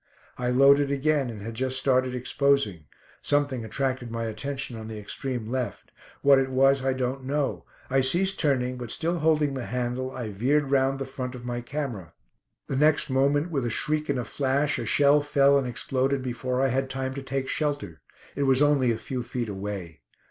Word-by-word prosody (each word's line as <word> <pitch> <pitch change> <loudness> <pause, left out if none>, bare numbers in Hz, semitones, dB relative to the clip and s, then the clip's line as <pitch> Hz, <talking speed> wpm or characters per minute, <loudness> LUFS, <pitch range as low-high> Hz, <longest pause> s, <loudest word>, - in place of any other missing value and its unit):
I 125 0 -2
loaded 140 +2 +5
again, 140 -1 +1
and 105 -3 -8
had 115 +1 -5
just 130 +2 -1
started 130 -1 +2
exposing. 125 - +1 0.4
Something 145 -4 0
attracted 130 +2 -2
my 115 0 -3
attention 135 +4 -4
on 110 -1 -7
the 110 -1 -7
extreme 120 +3 -4
left. 130 -2 -4 0.3
What 140 -1 +6
it 135 0 0
was 135 +1 +3
I 135 0 +1
don't 130 +1 -3
know. 140 +1 -2 0.2
I 135 +1 +2
ceased 180 +9 +2
turning, 130 -4 +1
but 120 -2 -6
still 170 +7 -1
holding 150 -2 +2
the 130 -3 -5
handle, 125 +1 -2
I 125 -4 -5
veered 135 +7 +1
round 135 0 +2
the 135 - -4
front 130 -1 -5
of 120 -1 -9
my 120 0 -3
camera. 120 - -5 0.5
The 135 - -3
next 150 -1 +3
moment, 140 +5 +2
with 140 -5 -1
a 120 - -1
shriek 150 +6 -1
and 140 - +1
a 125 - -2
flash, 140 +4 0
a - - -4
shell 145 +1 +4
fell 140 -1 +4
and 130 - -3
exploded 130 +2 -1
before 125 +1 -2
I 135 - +3
had 135 +1 -1
time 130 0 -3
to 140 - -5
take 135 0 -3
shelter. 140 - -2 0.3
It 140 - 0
was 130 -1 +4
only 140 -4 +3
a 115 - -1
few 125 +2 -4
feet 120 -1 -4
away. 95 -4 -6
130 Hz, 195 wpm, -26 LUFS, 125-140 Hz, 0.5 s, What